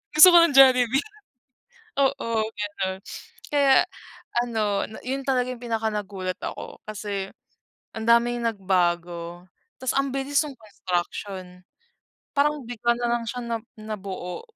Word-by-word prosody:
Gusto 310 +4 +11
ko - - +11
ng 335 - +3
Jollibee." 260 -1 +6 1.0
Oo, 270 -4 +1 0.2
gano'n. 200 -3 -3 0.5
Kaya 280 -2 +5 0.6
ano 215 -4 0
na 220 - -9
'yon 270 +2 -3
talaga 255 -2 +1
'yong 250 -1 -7
pinaka 225 -2 -1
nagulat 195 -3 -4
ako. - - -7
Kasi 200 -2 -5 0.6
ang 225 0 -5
daming 235 +1 +4
nagbago, 175 -4 -1 0.3
'tas 260 -1 0
ang 275 0 +1
bilis 275 +2 +1
no'ng 290 - -7
construction. 185 -2 -5 0.7
Parang 295 -1 +2
bigla 235 0 0
na 240 - -1
lang 240 -1 -2
siya 250 +2 -4
na 235 -1 -2 0.2
nabuo. 195 - -6
225 Hz, 130 wpm, -25 LUFS, 195-260 Hz, 1.0 s, Gusto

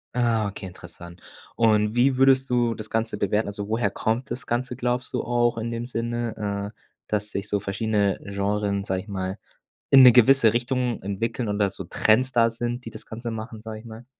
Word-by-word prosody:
Ah, 115 -3 +2
okay, 100 0 -7
interessant, 85 -1 -12 0.3
und 110 -1 +2
wie 130 +2 +3
würdest 135 0 +4
du 120 -2 +2
das 110 0 -8
Ganze 115 -1 -1
bewerten? 105 +2 0
Also, 100 0 -5
woher 110 -2 +1
kommt 115 +6 -2
das 125 +3 -5
Ganze, 125 +1 -2
glaubst 125 0 -2
du, 125 - 0
auch 120 0 +1
in 115 +1 -3
dem 115 +1 -4
Sinne, 115 -4 -3
äh, - - -47 0.3
dass 105 0 -2
sich 100 +1 -4
so 100 -1 -1
verschiedene 100 0 0
Genren, 100 0 -1
sage 95 -2 -2
ich - - -21
mal, 95 -1 -4 0.5
in 135 -1 +9
'ne 125 -1 +10
gewisse 125 -1 +5
Richtung 120 0 -1
entwickeln 115 +4 -3
und 105 0 -1
dass 100 -2 +1
so 95 - -7
Trends 115 +9 +2
da 115 -2 +4
sind, 120 +1 -4
die - - -5
das - - -11
Ganze 115 +1 -6
machen, 110 0 -6
sage 110 -1 -8
ich - - -17
mal? 115 +1 -11
110 Hz, 205 wpm, -24 LUFS, 105-120 Hz, 0.5 s, ne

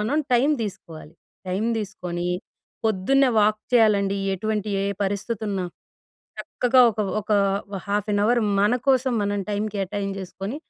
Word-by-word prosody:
మనం 220 +8 0 0.2
time 250 +4 +4
దీసుకోవాలి. 165 -6 -8 0.3
Time 190 +4 -1
దీసుకొని, 180 -4 -4 0.6
పొద్దున్నే 240 +7 +3
వాక్ 215 +1 +2
చెయ్యాలండి. 200 -4 +4 0.2
ఎటువంటి 215 +1 -2
ఏ - - -1 0.2
పరిస్థితున్నా. 200 -1 -2 0.7
చక్కగా 255 +1 +2
ఒక 215 - -4 0.2
ఒకా 210 0 0 0.4
ఓ - - -2
హాఫ్ 205 +1 -1
ఎన్ 205 - +2
అవరు 240 +3 +3 0.2
మన 210 +4 +3
కోసం 260 -1 +3
మనం 205 0 -1
టైం 205 0 -1
కేటాయింజేసుకొని, 195 +3 -4
205 Hz, 130 wpm, -24 LUFS, 195-225 Hz, 0.7 s, టైం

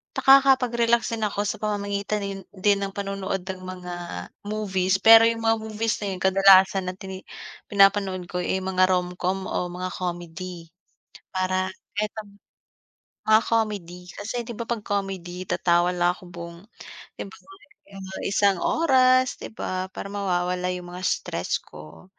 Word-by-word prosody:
nakakapag-relax 250 -4 +4
din 220 -2 -1
ako 205 0 -2
sa 205 - -2
pamamagitan 205 0 -2
yun 195 -1 -5
din 200 +1 +3
ng 195 -1 -4
panonood 195 -1 -3
ng 190 0 -5
mga 180 -1 -7 0.5
movies. 190 -3 0
Pero 225 0 +9
yung 230 0 +1
mga 225 0 +3
movies 220 +1 -1
na 200 -2 -3
yung 180 - -8
kadalasan 190 0 +6
na 185 - -2
tini 190 -1 -9 0.4
pinapanood 195 -2 +3
ko 180 - -3
eh, 190 +1 -1
mga 185 0 +3
Romcom 185 +1 -1
o 180 - -1
mga 185 +1 -4
comedy 175 -1 -6 0.7
para 185 0 0 0.3
kahit 210 0 0
ang 200 -1 -19 0.9
mga 215 0 +7
comedy. 205 -6 -1
Kasi 225 +4 -4
'di 235 - -8
ba, 235 - -4
'pag 235 -3 -2
comedy, 185 -3 -4
tatawa 175 +1 +2
lang 175 0 +3
ako - - -17
buong 170 0 -8 0.6
'di - - -4
ba - - -13 0.5
mga 190 -1 -8
isang 200 -1 +3
oras, 255 -4 +3
'di - - -6
ba? 185 -3 -4
Para 200 - -7
mawawala 180 -2 -1
yung 180 -1 -7
mga 180 - -7
stress - - -1
ko. 75 - -14
195 Hz, 150 wpm, -24 LUFS, 180-210 Hz, 0.9 s, Pero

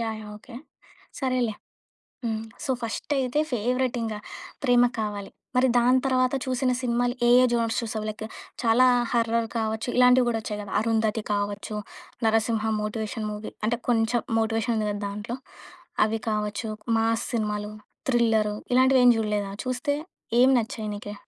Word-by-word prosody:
Yeah! 225 -1 -2
Yeah! 210 - -9
Okay. 235 +2 -14 0.7
సరేలే 255 -4 0 0.7
హ్మ్. 220 -1 -1 0.2
So, 265 - 0
first 230 +6 -4
అయితే 260 +2 0
సో, - - +3
ఫస్ట్ - - +1
ఫేవరెట్ 250 0 0
ఇంగా 220 -2 -3 0.5
ప్రేమ 245 -2 +5 0.2
కావాలి, 205 -2 -3 0.2
మరి 255 +1 +4
దాని 250 +2 +4
తర్వాత 255 -1 +2
చూసిన 255 0 +1
సినిమాలు 245 0 0
ఏ, - - +5
ఏ - - +5
జోనర్స్ 230 -1 +1
చూసావు? 215 -1 -4
లైక్ 215 +1 -6 0.4
చాలా 235 +3 +5 0.3
హారర్ 230 -1 +1
కావచ్చు 220 +1 -2
ఇలాంటివి 250 0 +6
గూడా 230 -1 0
ఒచ్చాయి 210 -1 -4
గదా! 200 -2 -7
'అరుంధతి' 220 -1 0
కావచ్చు, 205 +1 -3 0.5
'నరసింహ' 220 0 +2 0.2
మోటివేషన్ 215 +1 -3
మూవీ 210 +1 -6
అంటే 235 +2 +1
కొంచెం 235 0 +2 0.2
మోటివేషన్ 225 +1 0
ఉంది 215 -1 0
కదా 205 0 -3
దాంట్లో 210 +4 -5 0.7
అవి 220 +1 -1
కావచ్చు 210 +1 -2 0.3
మాస్ 225 0 +1
సినిమాలు, 210 -2 -1 0.4
థ్రిల్లర్, 225 -4 +3 0.2
ఇలాంటివేమి 255 -1 +6
జూడలేదా? 210 -2 -1
చూస్తే 255 +3 -1 0.5
ఏం 255 - +7
నచ్చాయి 220 -1 -4
నీకి? 205 0 -7
225 Hz, 150 wpm, -26 LUFS, 215-245 Hz, 0.7 s, ఏం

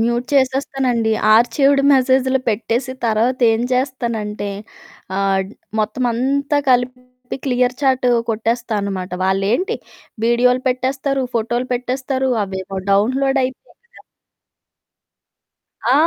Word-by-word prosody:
Mute 235 +2 0
చేసేస్తానండి. 260 -4 +1 0.2
ఆర్చీవ్డ్ 275 +5 +3
మెసేజ్‌లో 260 0 +3
పెట్టేసి 235 +4 -1
తర్వాతేం 230 +1 +2
చేస్తానంటే, 235 -6 -2 0.7
ఆహ్, 195 -1 +1
డ్ - - -15 0.3
మొత్తమంతా 255 +6 0
కలిపి 250 0 -2
క్లియర్ 250 0 +1
చాట్ 260 -2 +2 0.2
కొట్టేస్తా 225 +1 -1
అనమాట. 190 -2 -4
వాళ్ళేంటి 205 - 0 0.5
వీడియోలు 250 +2 +3
పెట్టేస్తారు, 265 +2 -1
ఫోటోలు 240 +3 -1
పెట్టేస్తారు, 260 +1 -2
అవేవో 190 0 -5
డౌన్లోడ్ 265 +6 +2
అయిపోతయ 260 - -8 2.1
ఆ! 250 - +4
250 Hz, 90 wpm, -19 LUFS, 225-265 Hz, 2.1 s, ఆ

